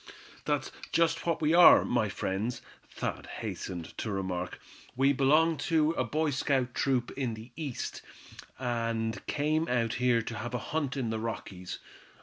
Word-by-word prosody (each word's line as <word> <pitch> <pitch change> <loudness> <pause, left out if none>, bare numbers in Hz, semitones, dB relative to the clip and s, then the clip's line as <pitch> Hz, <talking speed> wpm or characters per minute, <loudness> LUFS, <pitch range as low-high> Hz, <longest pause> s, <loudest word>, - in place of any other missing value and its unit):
"That's - - 0 0.2
just 165 0 +2
what 165 -1 0
we 155 +2 +3
are, 175 0 +9
my 110 -4 +1
friends," 100 +4 -2 0.3
Thad - - -4
hastened 85 -3 -6
to - - -2
remark; 95 -3 -3 0.4
"we 135 +2 +4
belong 155 +4 +4
to 160 -2 +4
a - - 0
Boy 155 0 0
Scout 130 -2 0
troop 130 -3 0
in 125 -5 -2
the 110 +3 -11
East, 145 -7 -4 0.6
and 115 -4 -2
came 155 +3 +1
out 115 -2 +1
here 120 -2 +3
to 110 - -5
have 120 +3 -4
a 125 - -5
hunt 145 -4 -1
in 120 -4 -1
the 110 - -2
Rockies. 100 -5 -5
125 Hz, 155 wpm, -30 LUFS, 110-150 Hz, 0.6 s, are